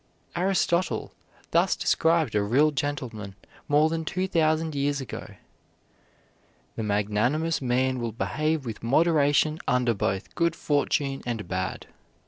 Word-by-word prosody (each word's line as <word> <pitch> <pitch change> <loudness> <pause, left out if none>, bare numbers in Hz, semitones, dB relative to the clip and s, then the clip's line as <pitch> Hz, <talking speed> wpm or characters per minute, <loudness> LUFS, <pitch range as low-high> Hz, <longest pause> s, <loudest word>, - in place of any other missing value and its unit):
Aristotle 180 -1 0 0.4
thus - - +3
described 165 -1 +2
a 105 - +2
real 135 +9 +3
gentleman 125 -8 -4 0.3
more 150 +1 +4
than 165 0 -2
two 185 +4 -2
thousand 160 -2 +1
years 140 0 0
ago: 130 -5 -7 1.4
"The - - -3
magnanimous 110 +11 0
man 130 0 +1
will 120 -1 -2
behave 155 +6 -1
with 115 -3 -6
moderation 150 +3 +3
under 125 -1 +2
both 95 -1 -2
good 170 -1 +1
fortune 145 -2 0
and 115 -4 -3
bad. 95 0 -3
145 Hz, 120 wpm, -26 LUFS, 115-160 Hz, 1.4 s, more